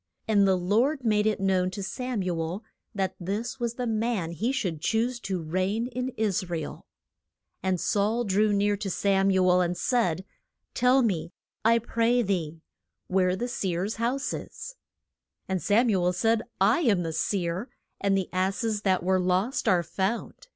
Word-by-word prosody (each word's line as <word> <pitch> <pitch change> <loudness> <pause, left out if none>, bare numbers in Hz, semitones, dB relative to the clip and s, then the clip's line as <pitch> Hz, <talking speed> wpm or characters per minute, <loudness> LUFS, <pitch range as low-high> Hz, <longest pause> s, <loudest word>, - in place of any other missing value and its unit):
And 205 -3 +4
the 190 -1 +3
Lord 235 - +1
made 210 -1 +3
it 215 - 0
known 190 -1 +2
to 195 +2 -6
Sam 250 0 -3
u 175 -2 -2
el 175 +7 -4 0.3
that 190 -2 -1
this 210 +8 -3
was 235 -1 -2
the 250 - -3
man 220 -6 -1
he 220 +9 -1
should 185 - -2
choose 235 +5 0
to 190 -6 -3
reign 185 +8 -1
in 255 0 -3
Is 195 -4 0
ra 170 - -1
el. 160 - -7 0.7
And 185 -1 0
Saul 215 +6 +1
drew 210 0 +2
near 205 0 +2
to 200 -1 -4
Sam 195 +1 +2
u 190 -1 +3
el, 180 0 +5
and 175 0 -1
said, 190 -8 0 0.5
Tell 250 +1 +4
me, 170 -6 -1 0.3
I 230 +1 +5
pray 235 +1 +1
thee, 165 -5 -2 0.5
where 185 -1 +2
the 240 +5 -3
seer's 195 -4 -2
house 250 +5 -1
is. - - -7 0.7
And 190 -2 -1
Sam 215 - +3
u 185 -3 +1
el 180 +1 +2
said, 225 +5 +2 0.2
I 200 - +4
am 215 - +2
the 165 -1 -3
seer; 175 - -1 0.3
and 195 -1 +2
the 190 - -1
ass 190 +4 0
es 215 -2 -1
that 190 -4 +1
were 185 +1 +2
lost 185 +7 0
are 180 -2 +4
found. 190 - -3
195 Hz, 180 wpm, -27 LUFS, 185-230 Hz, 0.7 s, el